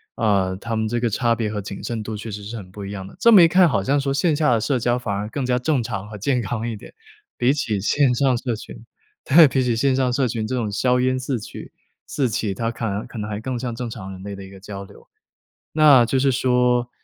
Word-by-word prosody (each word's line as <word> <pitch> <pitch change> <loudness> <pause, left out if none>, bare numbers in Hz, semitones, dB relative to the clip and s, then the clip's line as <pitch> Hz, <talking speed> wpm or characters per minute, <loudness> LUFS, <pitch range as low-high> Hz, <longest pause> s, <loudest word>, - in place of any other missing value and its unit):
呃， 100 -4 +1
他 115 +3 -4
们 110 0 -1
这 120 +2 -1
个 120 -1 0
差 115 +2 +1
别 110 -2 -2
和 105 - -3
谨 100 0 -7
慎 115 -2 -4
度 110 +1 -5
确 110 +2 -7
实 105 0 -7
是 110 +4 -7
很 95 -5 -9
不 100 0 -8
一 100 - -6
样 95 -2 -6
的。 - - -14
这 230 +4 +6
么 195 - +9
一 165 - +8
看 180 +1 +5
好 100 -10 0
像 140 +6 +1
说 135 0 -1
线 150 +2 +2
下 150 -3 +2
的 115 - +1
社 130 +4 0
交 120 +1 0
反 120 -5 -3
而 100 +1 -3
更 130 +6 -4
加 125 0 +1
正 135 +1 0
常 100 -3 -5
和 105 0 -9
健 125 +5 0
康 115 +2 -3
一 110 - -5
点， - - -14 0.4
比 125 +2 +2
起 110 -8 -1
线 130 +5 +2
上 130 0 +2
社 120 -2 -2
群， 115 +1 -11 0.4
对， 160 +2 +7
比 130 0 0
起 120 -2 0
线 130 +3 +2
上 130 -2 +1
社 130 0 +1
群 110 -1 -3
这 130 - -3
种 110 -4 -2
硝 125 +5 +1
烟 130 0 +1
四起- 130 -4 -5 0.3
四 135 -4 -1
起， 105 -2 -2
它 115 +4 -2
可 115 0 -5
能 100 0 -3
可 - - -11
能 105 -1 -4
还 105 -1 -4
更 130 +2 -3
像 120 -2 -4
正 120 0 -5
常 95 -4 -8
人 95 0 -9
类 100 0 -6
的 100 - -9
一 95 - -12
个 95 - -12
交 100 0 -8
流。 - - -16 0.7
那 145 -6 +6
就 130 - 0
是 135 +1 +3
说 125 -1 +1
120 Hz, 295 characters per minute, -22 LUFS, 105-130 Hz, 0.7 s, 么